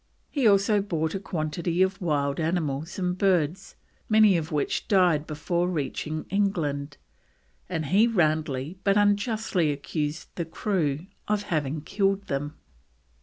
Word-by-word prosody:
He 275 Hz, -6 st, +2 dB
also 200 Hz, +1 st, +4 dB
bought 160 Hz, -5 st, -2 dB
a 195 Hz, -, -2 dB
quantity 170 Hz, 0 st, -1 dB
of 190 Hz, +1 st, -1 dB
wild 145 Hz, -4 st, 0 dB
animals 160 Hz, -2 st, -1 dB
and 180 Hz, -1 st, -1 dB
birds, 185 Hz, -1 st, 0 dB, 0.3 s
many 215 Hz, -3 st, +6 dB
of 165 Hz, -1 st, -2 dB
which 150 Hz, -2 st, -1 dB
died 175 Hz, -6 st, +3 dB
before 170 Hz, +4 st, -1 dB
reaching 155 Hz, -1 st, -3 dB
England, 155 Hz, -8 st, -1 dB, 0.7 s
and 160 Hz, -4 st, -2 dB
he 200 Hz, +10 st, +4 dB
roundly 155 Hz, -, 0 dB
but 200 Hz, 0 st, +3 dB
unjustly 205 Hz, -5 st, +2 dB
accused 150 Hz, +2 st, -3 dB
the 170 Hz, -, -3 dB
crew 165 Hz, -3 st, -1 dB, 0.2 s
of 210 Hz, -1 st, 0 dB
having 150 Hz, -1 st, -1 dB
killed 195 Hz, +4 st, 0 dB
them. 145 Hz, -5 st, -3 dB
170 Hz, 130 wpm, -26 LUFS, 150-195 Hz, 0.7 s, many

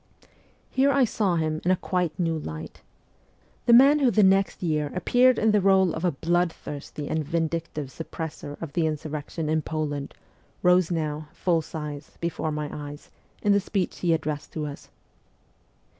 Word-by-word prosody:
Here 275 Hz, +2 st, +3 dB
I 275 Hz, -2 st, +4 dB
saw 205 Hz, -5 st, 0 dB
him 155 Hz, -1 st, -1 dB
in 175 Hz, -, +1 dB
a 185 Hz, -, +5 dB
quite 180 Hz, -3 st, -2 dB
new 165 Hz, -3 st, 0 dB
light. 80 Hz, -, -7 dB, 0.9 s
The 235 Hz, -, +7 dB
man 275 Hz, +5 st, +7 dB
who 270 Hz, -3 st, +4 dB
the 215 Hz, -3 st, +4 dB
next 195 Hz, 0 st, +3 dB
year 150 Hz, -3 st, 0 dB
appeared 250 Hz, +7 st, +4 dB
in 220 Hz, 0 st, +3 dB
the 210 Hz, -1 st, +3 dB
role 190 Hz, -2 st, +4 dB
of 160 Hz, -, -5 dB
a 180 Hz, -, +3 dB
blood 175 Hz, +3 st, +1 dB
thirsty 145 Hz, -1 st, -7 dB
and 155 Hz, -1 st, -1 dB
vindictive 160 Hz, -2 st, -2 dB
suppressor 160 Hz, -1 st, -6 dB
of 160 Hz, -4 st, -7 dB
the 165 Hz, -1 st, +2 dB
insurrection 155 Hz, +1 st, -4 dB
in 155 Hz, +1 st, +1 dB
Poland 145 Hz, -2 st, -3 dB, 0.5 s
rose 180 Hz, -1 st, +4 dB
now, 155 Hz, -3 st, -2 dB
full 170 Hz, -3 st, +1 dB
size, 150 Hz, -2 st, -7 dB
before 165 Hz, -2 st, -2 dB
my 150 Hz, 0 st, -3 dB
eyes, 145 Hz, 0 st, -8 dB, 0.3 s
in 205 Hz, -, +3 dB
the 200 Hz, -, +5 dB
speech 195 Hz, -2 st, -2 dB
he 175 Hz, -, +1 dB
addressed 150 Hz, -2 st, -2 dB
to 155 Hz, -2 st, -3 dB
us. 145 Hz, -1 st, -8 dB
165 Hz, 170 wpm, -26 LUFS, 150-185 Hz, 0.9 s, The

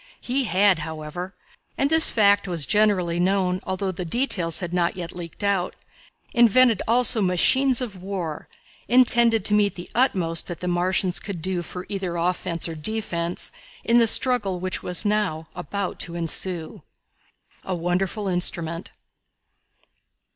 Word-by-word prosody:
He 260 Hz, +2 st, -1 dB
had, 190 Hz, -1 st, +3 dB
however, 160 Hz, +4 st, -7 dB, 0.4 s
and 280 Hz, +2 st, 0 dB
this 320 Hz, 0 st, +7 dB
fact 200 Hz, -2 st, +3 dB
was 170 Hz, -5 st, -1 dB
generally 195 Hz, -5 st, +1 dB
known, 185 Hz, 0 st, 0 dB
although 190 Hz, +1 st, -2 dB
the 180 Hz, 0 st, -6 dB
details 180 Hz, -5 st, +1 dB
had 175 Hz, -2 st, -5 dB
not 175 Hz, 0 st, 0 dB
yet 170 Hz, -2 st, -7 dB
leaked 175 Hz, +2 st, -8 dB
out 195 Hz, -3 st, 0 dB, 0.6 s
invented 240 Hz, -2 st, +4 dB
also 235 Hz, -1 st, +3 dB
machines 250 Hz, +8 st, +3 dB
of 205 Hz, -7 st, -6 dB
war 180 Hz, -5 st, -5 dB, 0.4 s
intended 235 Hz, -4 st, +4 dB
to 210 Hz, -, +2 dB
meet 205 Hz, -1 st, +2 dB
the 175 Hz, -, -10 dB
utmost 180 Hz, -10 st, 0 dB
that 175 Hz, -2 st, -7 dB
the 180 Hz, -, -5 dB
Martians 180 Hz, +1 st, 0 dB
could 200 Hz, -5 st, -6 dB
do 180 Hz, +1 st, -3 dB
for 180 Hz, +1 st, -8 dB
either 190 Hz, -4 st, -4 dB
offence 170 Hz, -1 st, -1 dB
or 165 Hz, -, -5 dB
defence 170 Hz, 0 st, -3 dB, 0.3 s
in 235 Hz, +1 st, +3 dB
the 230 Hz, -, +4 dB
struggle 210 Hz, -6 st, +3 dB
which 185 Hz, +1 st, -3 dB
was 180 Hz, +3 st, -2 dB
now 205 Hz, -7 st, -1 dB
about 200 Hz, +4 st, -5 dB
to 170 Hz, -1 st, -3 dB
ensue. 170 Hz, 0 st, -1 dB, 0.8 s
A 185 Hz, -, -3 dB
Wonderful 180 Hz, +4 st, -2 dB
Instrument. 170 Hz, -2 st, -1 dB
185 Hz, 145 wpm, -23 LUFS, 175-210 Hz, 0.8 s, this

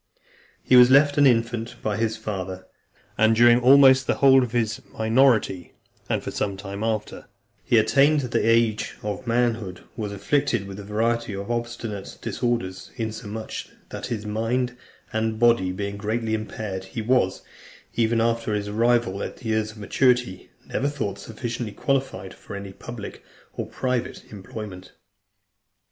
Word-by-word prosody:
He 130 Hz, -, +4 dB
was 125 Hz, 0 st, +9 dB
left 145 Hz, +2 st, +5 dB
an 145 Hz, -, +7 dB
infant 115 Hz, -1 st, 0 dB
by 105 Hz, -1 st, 0 dB
his 110 Hz, 0 st, -1 dB
father, 95 Hz, -4 st, -5 dB, 0.5 s
and 110 Hz, +1 st, +5 dB
during 120 Hz, +1 st, +6 dB
almost 130 Hz, +1 st, +6 dB
the -, -, +2 dB
whole 135 Hz, -1 st, +6 dB
of 125 Hz, -3 st, -2 dB
his 115 Hz, -3 st, -1 dB
minority, 110 Hz, -5 st, +2 dB, 0.3 s
and -, -, 0 dB
for -, -, -4 dB
some 100 Hz, -1 st, -2 dB
time 100 Hz, +1 st, -6 dB
after 110 Hz, -2 st, -3 dB, 0.4 s
he 115 Hz, -, +3 dB
attained 140 Hz, +6 st, +4 dB
the 125 Hz, -3 st, -1 dB
age 115 Hz, -1 st, +2 dB
of 105 Hz, +3 st, -4 dB
manhood, 115 Hz, -6 st, 0 dB
was 105 Hz, -2 st, -4 dB
afflicted 115 Hz, +2 st, 0 dB
with 100 Hz, 0 st, -8 dB
a -, -, -7 dB
variety 115 Hz, +1 st, -1 dB
of 100 Hz, +4 st, -5 dB
obstinate 120 Hz, -4 st, -4 dB
disorders, 115 Hz, -6 st, -2 dB
insomuch 110 Hz, -2 st, -5 dB, 0.2 s
that -, -, -6 dB
his 110 Hz, -3 st, -4 dB
mind 120 Hz, +4 st, -1 dB, 0.4 s
and 110 Hz, 0 st, -1 dB
body 115 Hz, -6 st, +3 dB
being 100 Hz, +2 st, -4 dB
greatly 110 Hz, +2 st, -2 dB
impaired, 110 Hz, -3 st, -4 dB
he 115 Hz, +4 st, -5 dB
was, 110 Hz, -6 st, +1 dB, 0.5 s
even 115 Hz, 0 st, +1 dB
after 115 Hz, -1 st, 0 dB
his 105 Hz, 0 st, -2 dB
arrival 115 Hz, -2 st, +1 dB
at -, -, -7 dB
years 110 Hz, -1 st, 0 dB
of -, -, -17 dB
maturity, 120 Hz, -2 st, +1 dB, 0.2 s
never 140 Hz, -, -1 dB
thought 135 Hz, -9 st, -4 dB
sufficiently 115 Hz, -1 st, -5 dB
qualified 130 Hz, -9 st, -2 dB
for -, -, -10 dB
any 100 Hz, -1 st, -7 dB
public 115 Hz, +1 st, -9 dB, 0.3 s
or -, -, -4 dB
private 125 Hz, -2 st, -3 dB
employment. 100 Hz, -2 st, -9 dB
110 Hz, 150 wpm, -24 LUFS, 105-120 Hz, 0.5 s, was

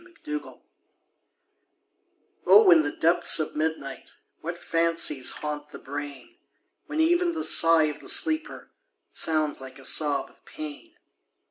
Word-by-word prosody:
IN 350 Hz, -1 st, -22 dB
THE 300 Hz, 0 st, -4 dB
DARK -, -, -16 dB, 1.9 s
O 425 Hz, -3 st, +6 dB
In 335 Hz, -2 st, +6 dB
the -, -, -4 dB
depths 170 Hz, +1 st, +3 dB
of 155 Hz, -, -4 dB
midnight 155 Hz, -3 st, -5 dB, 0.3 s
What 170 Hz, +2 st, -7 dB
fancies 165 Hz, -6 st, 0 dB
haunt 150 Hz, 0 st, -7 dB
the -, -, -11 dB
brain! 145 Hz, -, -9 dB, 0.5 s
When 305 Hz, +1 st, -5 dB
even 345 Hz, +2 st, +1 dB
the 320 Hz, -1 st, -4 dB
sigh 165 Hz, -1 st, +5 dB
of 150 Hz, -1 st, -3 dB
the -, -, -4 dB
sleeper 315 Hz, 0 st, 0 dB, 0.4 s
Sounds 155 Hz, -3 st, 0 dB
like 130 Hz, -1 st, -12 dB
a 135 Hz, -, -10 dB
sob 145 Hz, -3 st, +2 dB
of -, -, -31 dB
pain. 310 Hz, +2 st, -11 dB
165 Hz, 140 wpm, -24 LUFS, -, 1.9 s, O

